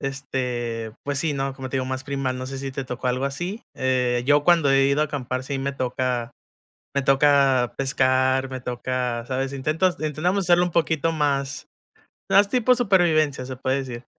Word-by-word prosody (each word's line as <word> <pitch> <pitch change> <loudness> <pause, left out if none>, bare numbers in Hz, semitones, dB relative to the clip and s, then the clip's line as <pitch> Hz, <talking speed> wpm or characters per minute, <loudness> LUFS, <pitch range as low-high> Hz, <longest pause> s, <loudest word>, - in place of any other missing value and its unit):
este, 125 -4 -3
pues 140 -1 -1
sí, 155 +2 0
¿no?, 135 -1 -2
como 130 -1 -7
te 135 - -3
digo, 130 - -1
más 130 0 -4
primal, 135 -2 -2
no 130 - -5
sé 135 0 -6
si 135 0 -5
te 135 0 -4
tocó 125 +1 -5
algo 125 +2 0
así, 175 - -4
eh 125 -2 0
yo 145 +1 +4
cuando 165 -5 +4
he 135 0 +4
ido 140 +2 +2
a - - +3
acampar 130 -3 -4
sí 135 +1 -3
me 140 +1 -2
toca 125 -2 -2 0.6
me 140 - +2
toca 135 -2 +3
pescar, 130 0 +1
me 130 -1 -6
toca, 125 -1 -3
¿sabes? 135 +1 -2
Intentas 155 +7 0
intentamos 165 +6 -1
hacerlo 175 0 +4
un 180 - -2
poquito 165 -1 +1
más 140 -3 -1 0.6
más 200 +1 +5
tipo 250 +2 +3
supervivencia, 170 - +2
se 130 0 -6
puede 130 +1 -1
decir. 125 -3 -6
135 Hz, 185 wpm, -23 LUFS, 130-150 Hz, 0.6 s, más